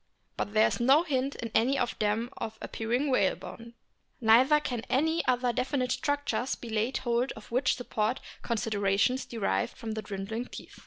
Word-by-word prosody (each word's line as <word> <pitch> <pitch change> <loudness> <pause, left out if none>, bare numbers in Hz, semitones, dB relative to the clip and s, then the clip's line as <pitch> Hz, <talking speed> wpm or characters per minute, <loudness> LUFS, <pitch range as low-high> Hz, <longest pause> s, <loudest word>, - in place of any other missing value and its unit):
But 205 - -3
there 215 0 +5
is - - -2
no 270 +7 +5
hint 275 -3 -1
in 230 -1 -5
any 255 +5 +3
of 245 -2 0
them 220 +4 0
of 220 0 -5
appearing 245 +6 -1
whalebone. 230 +1 -1 0.4
Neither 250 +6 +6
can 245 -5 -3
any 320 +5 +2
other 250 -1 +2
definite 255 +1 -1
structures 285 -4 -1
be 235 - -9
laid 220 +4 0
hold 240 +1 0
of 220 - -13
which 255 +2 +2
support 235 0 -1 0.2
considerations 220 +1 +1
derived 195 - -1
from 225 - -5
the 220 0 -3
dwindling 210 +3 -4
teeth. - - -11
240 Hz, 165 wpm, -29 LUFS, 220-260 Hz, 0.4 s, Neither